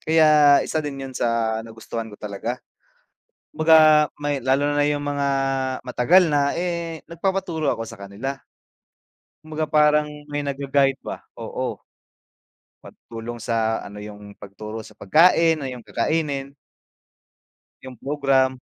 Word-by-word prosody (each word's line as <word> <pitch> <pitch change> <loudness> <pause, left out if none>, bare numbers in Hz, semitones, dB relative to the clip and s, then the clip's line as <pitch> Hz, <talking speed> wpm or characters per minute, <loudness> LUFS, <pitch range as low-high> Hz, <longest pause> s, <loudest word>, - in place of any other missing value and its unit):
kaya 155 -3 +5
isa 160 - -1
din 145 -2 -5
'yun 135 - -8
sa 115 -2 0
nagustuhan 115 0 -7
ko 105 - -12
talaga. 105 +4 -5 1.0
Kumbaga 155 -1 +6
may 145 -2 -2
lalo 135 +3 +1
na 145 0 +2
'yung 145 0 -2
mga 145 -1 -1 0.6
matagal 160 +9 +4
na 140 -1 +1
eh, 170 -2 -3
nagpapaturo 170 -3 -2
ako 115 - -5
sakanila. 110 +7 -7 1.0
Kumbaga 155 -1 -5
parang 150 -1 +4 0.2
may 145 0 -3
nag-ga-guide 140 -1 0
ba, - - -7 0.2
oo. - - -4 1.0
Matutulong 115 +1 -9
sa 115 -1 0
ano 105 +1 -9
'yung 105 -1 -11
pagturo 105 +2 -8
sa 110 - -15
pagkain, 165 - +4
o - - -3
'yung 125 -2 -8
kakainin. 140 0 -1 1.3
Yung 130 -1 -10
program. 135 -2 +1
140 Hz, 120 wpm, -23 LUFS, 115-155 Hz, 1.3 s, Kumbaga